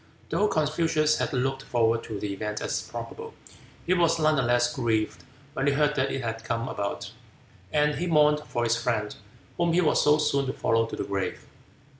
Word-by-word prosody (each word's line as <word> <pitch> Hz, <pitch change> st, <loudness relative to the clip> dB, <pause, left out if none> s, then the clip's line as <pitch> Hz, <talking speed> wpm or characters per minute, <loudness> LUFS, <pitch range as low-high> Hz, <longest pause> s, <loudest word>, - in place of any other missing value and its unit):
Though 210 Hz, -, +2 dB
Confucius 155 Hz, -1 st, +1 dB
had -, -, -1 dB
looked 135 Hz, 0 st, -1 dB
forward 115 Hz, -3 st, +1 dB
to 110 Hz, -3 st, -5 dB
the 100 Hz, -1 st, -3 dB
event 105 Hz, +1 st, -4 dB
as -, -, -2 dB
probable, -, -, -8 dB, 0.5 s
he 180 Hz, -, +2 dB
was 170 Hz, -2 st, +3 dB
none 155 Hz, -1 st, +3 dB
the 135 Hz, -, +2 dB
less 120 Hz, 0 st, +2 dB
grieved 115 Hz, -4 st, -1 dB, 0.3 s
when 135 Hz, -, -1 dB
he 140 Hz, -, +3 dB
heard 150 Hz, +1 st, +2 dB
that 130 Hz, -, +1 dB
it 135 Hz, -, -3 dB
had 115 Hz, -1 st, -4 dB
come 115 Hz, +1 st, -2 dB
about, 100 Hz, 0 st, -4 dB, 0.6 s
and 150 Hz, 0 st, +2 dB
he 170 Hz, +5 st, -2 dB
mourned 150 Hz, -2 st, +4 dB
for 120 Hz, -5 st, -3 dB
his 115 Hz, 0 st, +2 dB
friend, 110 Hz, -3 st, -1 dB, 0.4 s
whom 170 Hz, -1 st, +1 dB
he 180 Hz, -, +4 dB
was 155 Hz, -, +3 dB
so 150 Hz, +1 st, +5 dB
soon 140 Hz, -3 st, +1 dB
to 130 Hz, -, -2 dB
follow 115 Hz, 0 st, +1 dB
to -, -, -6 dB
the -, -, -3 dB
grave. 100 Hz, -1 st, -3 dB
135 Hz, 200 wpm, -26 LUFS, 115-150 Hz, 0.6 s, so